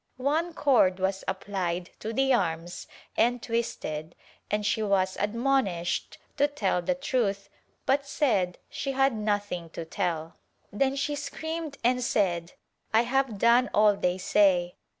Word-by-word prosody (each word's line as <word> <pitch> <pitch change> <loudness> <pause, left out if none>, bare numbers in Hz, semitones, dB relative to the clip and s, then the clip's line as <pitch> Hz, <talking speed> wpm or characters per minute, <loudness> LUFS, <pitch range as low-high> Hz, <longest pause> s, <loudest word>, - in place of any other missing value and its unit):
One 315 +6 0
cord 195 -10 +3
was 190 +1 -1
applied 185 -3 -3
to 220 - -4
the 270 +3 +2
arms 170 -5 -1 0.3
and 245 +2 +2
twisted 175 -10 -3 0.3
and 210 0 -1
she 220 - +1
was 190 -3 +1
admonished 210 -6 0 0.2
to 285 0 +4
tell 205 -11 0
the 265 +10 0
truth 235 -8 -1 0.4
but 275 +1 +1
said 205 - +1
she 275 - -4
had 270 0 +3
nothing 205 -5 -2
to 165 - -4
tell. 165 -1 -3 0.4
Then 265 +5 +1
she 285 +1 -1
screamed 315 +1 -5
and 250 +1 +2
said 175 -7 0 0.4
"I 220 +2 +4
have 255 -2 0
done 235 +4 +4
all 210 -1 +5
they 180 -2 0
say." 185 -2 +3
210 Hz, 140 wpm, -27 LUFS, 185-270 Hz, 0.4 s, all